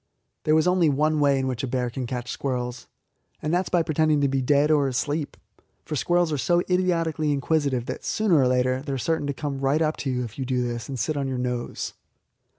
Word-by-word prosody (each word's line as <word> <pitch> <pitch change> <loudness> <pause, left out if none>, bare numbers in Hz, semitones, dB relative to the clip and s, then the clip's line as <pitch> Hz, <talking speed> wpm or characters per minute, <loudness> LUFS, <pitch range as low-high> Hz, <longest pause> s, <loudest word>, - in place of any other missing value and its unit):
There 155 0 +4
is 160 - +2
only 180 -3 +4
one 155 +2 +1
way 140 -1 +4
in 135 - -1
which 130 -3 -2
a - - -1
bear 125 -1 -1
can 125 0 -4
catch 125 0 -4
squirrels, 125 -2 -3 0.5
and 155 +2 -2
that 180 +2 +2
is - - -7
by 175 -2 +2
pretending 155 -1 +2
to 140 - +3
be 135 0 0
dead 145 +3 +3
or 145 -2 +3
asleep; 145 +4 -2 0.5
for 155 - -4
squirrels 175 +3 +2
are 145 - -1
so 175 +5 +2
idiotically 165 -4 +1
inquisitive 140 -3 0
that 130 - -5
sooner 205 -8 +2
or 130 - +4
later 130 +1 +1
they 140 0 -4
are - - -1
certain 160 +3 -1
to 140 - -1
come 140 0 -4
right 135 +3 +2
up 155 -1 0
to 140 - -3
you 125 -1 -1
if 120 +2 -8
you - - -1
do 125 -1 0
this, 120 +2 -5
and 135 - -4
sit 150 +7 -1
on 140 -1 -1
your 130 -1 -2
nose. 125 -1 -3
140 Hz, 240 wpm, -25 LUFS, 130-155 Hz, 0.5 s, There